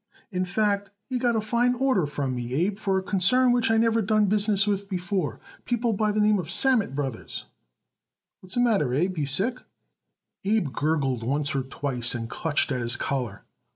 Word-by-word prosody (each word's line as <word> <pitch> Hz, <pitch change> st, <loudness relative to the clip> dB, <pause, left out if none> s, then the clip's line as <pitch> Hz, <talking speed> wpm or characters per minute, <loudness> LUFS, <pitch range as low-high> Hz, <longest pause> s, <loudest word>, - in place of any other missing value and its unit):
In 185 Hz, -1 st, -1 dB
fact, 200 Hz, +1 st, 0 dB, 0.2 s
he 255 Hz, -2 st, -3 dB
got 240 Hz, -1 st, +1 dB
a 220 Hz, -, +1 dB
fine 240 Hz, +3 st, +1 dB
order 250 Hz, -, +1 dB
from 145 Hz, -3 st, -3 dB
me, 125 Hz, 0 st, -4 dB
Abe, 195 Hz, +7 st, 0 dB
for 195 Hz, -3 st, 0 dB
a 190 Hz, -, -1 dB
concern 245 Hz, +7 st, +3 dB
which 240 Hz, -2 st, +2 dB
I 225 Hz, -, +3 dB
never 230 Hz, 0 st, +3 dB
done 215 Hz, +1 st, +2 dB
business 205 Hz, 0 st, +2 dB
with 200 Hz, -1 st, -2 dB
before. 180 Hz, -, -2 dB, 0.2 s
People 240 Hz, -1 st, 0 dB
by 215 Hz, +1 st, +1 dB
the 210 Hz, -, -1 dB
name 210 Hz, 0 st, +4 dB
Sammet 205 Hz, -, +2 dB
Brothers. 135 Hz, -5 st, -4 dB, 0.9 s
What's 185 Hz, 0 st, -2 dB
the 245 Hz, -, +2 dB
matter, 200 Hz, -, +2 dB
Abe? 180 Hz, +6 st, 0 dB
Are -, -, -1 dB
you 145 Hz, -, -1 dB
sick?" 220 Hz, -, -1 dB, 0.8 s
Abe 195 Hz, -9 st, 0 dB
gurgled 140 Hz, -5 st, 0 dB
once 140 Hz, +5 st, -1 dB
or 135 Hz, -, 0 dB
twice 130 Hz, -2 st, 0 dB
and 115 Hz, -1 st, -4 dB
clutched 155 Hz, -2 st, 0 dB
at 130 Hz, -2 st, -1 dB
his 120 Hz, +1 st, +2 dB
collar. 125 Hz, -7 st, -3 dB
195 Hz, 190 wpm, -25 LUFS, 140-220 Hz, 0.9 s, name